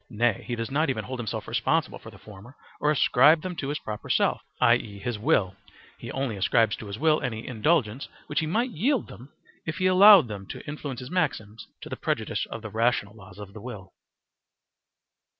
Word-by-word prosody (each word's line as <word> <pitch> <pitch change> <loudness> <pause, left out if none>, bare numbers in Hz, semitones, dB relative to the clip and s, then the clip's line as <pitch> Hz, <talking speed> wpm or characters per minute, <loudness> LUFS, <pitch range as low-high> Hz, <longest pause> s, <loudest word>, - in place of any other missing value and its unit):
Nay, 110 -1 0
he 120 - -2
does 115 +2 -5
not 155 +2 +1
even 135 - -2
hold 130 -1 -6
himself 110 -5 -4
responsible - - 0
for - - -11
the - - -14
former 105 +5 -14 0.2
or 150 - +1
ascribe 150 +1 +4
them 185 -1 -4
to 135 - -3
his 145 +1 -2
proper 105 -1 -7
self, - - +2 0.2
i.e., 115 -4 +2
his 110 +2 -4
will: 95 -3 +1 0.4
he - - -7
only 135 -5 -2
ascribes 110 +2 +2
to 110 - -9
his 100 +1 -6
will 155 +2 +2
any 115 -5 -4
indulgence 130 0 0 0.2
which - - -1
he 160 - -2
might 235 +9 0
yield 245 - 0
them 130 +5 -12 0.3
if 160 0 -5
he 185 - -1
allowed 185 - +8
them 100 -3 -7
to - - -8
influence 145 -3 -6
his 125 - -9
maxims 115 - -2
to - - -8
the - - -5
prejudice - - -2
of 115 - -8
the 110 - -6
rational 110 -3 0
laws 95 -3 -14
of 100 -1 -10
the 110 - -10
will. 100 -6 -9
120 Hz, 205 wpm, -26 LUFS, 105-150 Hz, 0.4 s, allowed